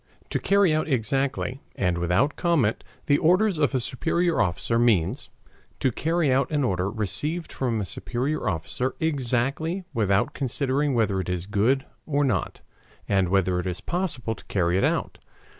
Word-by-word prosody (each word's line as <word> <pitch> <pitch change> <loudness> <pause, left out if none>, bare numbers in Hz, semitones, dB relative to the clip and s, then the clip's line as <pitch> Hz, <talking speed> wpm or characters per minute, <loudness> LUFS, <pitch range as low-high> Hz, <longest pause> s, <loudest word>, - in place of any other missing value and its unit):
To - - 0
carry 200 -4 +3
out 155 0 0
exactly 135 +1 0
and 90 -2 0
without 90 - +1
comment 160 - +1 0.2
the 145 0 +3
orders 185 +2 +3
of 145 -2 +2
a - - +3
superior 170 +8 0
officer 90 +7 0
means: 110 -9 +1 0.5
to 130 - +2
carry 160 +1 +1
out 135 0 +2
an 150 -2 0
order 95 -4 0
received 145 - -2
from 120 -4 -1
a 100 - -2
superior 120 - -2
officer 95 - -2
exactly 145 +4 -1
without 105 -4 +1
considering 140 +1 0
whether 105 -4 +1
it 90 - -3
is 90 -1 -2
good 110 +7 +1 0.2
or 145 -1 +1
not, 115 -10 -1 0.5
and 95 -3 +2
whether 90 -1 +2
it 90 - -3
is 90 -1 -3
possible 165 -11 -2
to - - -14
carry 90 -2 0
it 95 - +2
out. - - 0
125 Hz, 160 wpm, -25 LUFS, 100-150 Hz, 0.5 s, carry